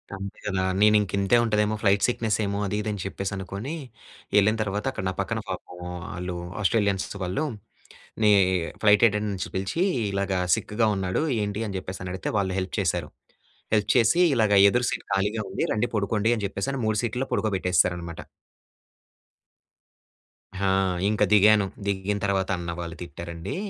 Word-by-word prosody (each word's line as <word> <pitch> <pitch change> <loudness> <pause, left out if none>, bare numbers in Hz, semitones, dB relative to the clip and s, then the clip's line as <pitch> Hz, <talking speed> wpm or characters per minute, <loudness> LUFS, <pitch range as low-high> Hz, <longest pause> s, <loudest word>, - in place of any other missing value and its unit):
అంతే 100 0 -7
కదా! 95 -2 0 0.2
నేనింక 105 -2 +4
ఇంతే 100 +4 +3
ఉంటాదేమో, 105 -1 +1
ఫ్లైట్ 100 -1 +3
సిక్నెస్సేమో 110 -4 -1
అది 100 - -2
ఇది 110 - -3
అని 100 -2 -4
చెప్పేసనుకోని 100 - -4 0.6
వెళ్ళిన 105 +2 +5
తర్వాత 105 0 -2
అక్కడ 130 - -5
నా - - -3
పక్కన 110 +4 -1
పాపం 90 -1 -6 0.4
ఆళ్ళు 90 0 -4 0.3
ఆస్ట్రేలియన్స్ 100 -2 +1 0.2
వాళ్ళు, 95 +11 -1 0.8
నీ 105 - +6 0.5
ఫ్లైట్ 105 0 +6
అటెండెంట్స్ 105 -2 -3
పిలిచి, 95 - -1 0.3
ఇలాగ 100 0 -1 0.2
సిక్‌గా 110 +1 0
ఉన్నాడు 95 +5 -1 0.2
ఏంటి? 105 +2 -2
అని 100 - -4
చెప్పేసి 95 0 -7
అని 90 - -4
అడిగితే 95 - -4
వాళ్ళు 95 -2 -1
హెల్ప్ 95 - -5
చేశారు. - - -1 0.6
హెల్ప్ 105 -1 +1
చేసి 115 +9 +4
ఇలాగ, 110 -4 +2 0.2
ఎదురు 125 +3 +1
సీట్ - - -5
ఖాళీగా 105 +3 0
ఉంది. 95 - -2
రండి 110 +3 0
పడుకోండి 105 +2 +1
అని 105 - -4
చెప్పేసి, 100 +5 -4
అని 135 - -3
3 110 -1 +1
సీట్‌లో 125 +3 -2
పడుకోబెట్టేసారనమాట. 90 -4 0 2.4
ఆ! 100 0 0 0.4
ఇంక 105 - +1
దిగాను. 105 0 +6 0.2
దిగిన 100 0 -1
తర్వాత 95 -1 0
అన్న 85 -1 -4
వాళ్ళు 85 -1 -5
తిట్టారండి. 85 +1 -6
100 Hz, 145 wpm, -25 LUFS, 95-110 Hz, 2.4 s, నీ